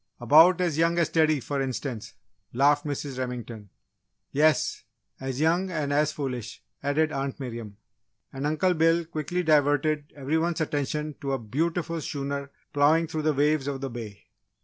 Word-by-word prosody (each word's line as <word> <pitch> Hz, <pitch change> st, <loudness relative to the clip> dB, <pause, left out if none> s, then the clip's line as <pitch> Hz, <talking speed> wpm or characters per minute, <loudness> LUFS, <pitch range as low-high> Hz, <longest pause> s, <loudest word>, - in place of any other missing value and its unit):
"About 160 Hz, +9 st, +6 dB
as 165 Hz, -4 st, 0 dB
young 165 Hz, +1 st, +3 dB
as 170 Hz, -2 st, +2 dB
Teddy, 155 Hz, -2 st, +3 dB
for 140 Hz, +2 st, -3 dB
instance," 120 Hz, -5 st, -4 dB, 0.4 s
laughed 145 Hz, +4 st, +3 dB
Mrs. 140 Hz, -2 st, -4 dB
Remington. 120 Hz, -5 st, -5 dB, 0.6 s
"Yes, 150 Hz, +1 st, +2 dB, 0.4 s
as 130 Hz, 0 st, -4 dB
young 170 Hz, +5 st, +2 dB
and 150 Hz, -5 st, -2 dB
as 150 Hz, +1 st, +2 dB
foolish," 125 Hz, -6 st, -5 dB, 0.2 s
added 150 Hz, +2 st, +1 dB
Aunt 135 Hz, -1 st, -3 dB
Miriam. 115 Hz, -6 st, -7 dB, 0.6 s
And 135 Hz, +2 st, -2 dB
Uncle 155 Hz, +4 st, +2 dB
Bill 165 Hz, +1 st, +3 dB
quickly 160 Hz, +2 st, -3 dB
diverted 150 Hz, -1 st, +2 dB
every 145 Hz, +3 st, 0 dB
one's 170 Hz, +1 st, -1 dB
attention 150 Hz, 0 st, -2 dB
to 140 Hz, -1 st, -2 dB
a -, -, +1 dB
beautiful 165 Hz, -, -2 dB
schooner 140 Hz, 0 st, -4 dB, 0.2 s
ploughing 150 Hz, +3 st, +4 dB
through 160 Hz, -1 st, -3 dB
the 155 Hz, 0 st, +2 dB
waves 145 Hz, 0 st, +2 dB
of 135 Hz, -2 st, -3 dB
the 135 Hz, -2 st, -4 dB
bay. 110 Hz, -4 st, -8 dB
145 Hz, 155 wpm, -26 LUFS, 135-160 Hz, 0.6 s, About